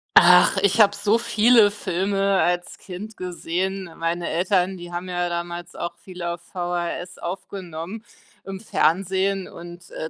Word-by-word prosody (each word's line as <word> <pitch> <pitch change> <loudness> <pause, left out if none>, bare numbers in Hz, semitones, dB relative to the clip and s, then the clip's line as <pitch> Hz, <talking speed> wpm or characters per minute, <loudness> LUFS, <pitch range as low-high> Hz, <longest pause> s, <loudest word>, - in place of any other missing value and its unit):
Ach, 180 +2 +7
ich 200 +3 +2
habe 205 -1 +5
so 205 +2 +2
viele 230 -1 +5
Filme 195 0 0
als 175 0 -1
Kind 205 +4 -9
gesehen. 185 +1 -3
Meine 170 +1 -2
Eltern, 185 +2 +1
die 175 0 -9
haben 175 +1 -4
ja 175 0 -1
damals 175 0 -5
auch 170 0 -4
viel 180 -1 -10
auf 170 0 -3
VHS 175 0 -4
aufgenommen 185 +2 -6 0.4
im 195 -1 -7
Fernsehen 190 +1 +1
und, 175 0 -11
äh, 160 - -5
180 Hz, 145 wpm, -23 LUFS, 175-195 Hz, 0.4 s, Ach